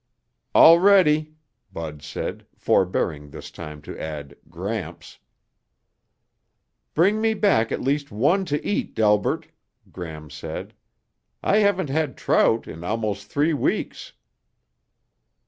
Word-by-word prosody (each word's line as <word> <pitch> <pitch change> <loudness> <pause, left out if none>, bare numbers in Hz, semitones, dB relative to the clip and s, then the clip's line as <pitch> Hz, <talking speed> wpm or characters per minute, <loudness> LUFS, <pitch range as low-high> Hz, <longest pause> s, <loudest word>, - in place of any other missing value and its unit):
"All 165 +1 +9
ready," 155 -6 +4 0.4
Bud 75 -3 -7
said, 80 +2 -6
forebearing 80 -5 0
this - - -10
time 75 -3 -9
to - - -8
add 75 -3 -6
"Gramps." 90 0 -6 1.8
"Bring 200 +7 +3
me 220 0 +2
back 195 - +2
at - - -2
least 140 +2 0
one 145 - +2
to 150 -3 -2
eat, 205 - -2
Delbert," 105 -2 +1 0.4
Gram 80 -4 -8
said. 75 - -7 0.7
"I 200 - +3
haven't 195 -7 +2
had 150 -3 -1
trout 115 0 +2
in 80 +2 -9
almost 105 0 -3
three 150 +3 +1
weeks." 140 - -2
115 Hz, 110 wpm, -23 LUFS, -, 1.8 s, All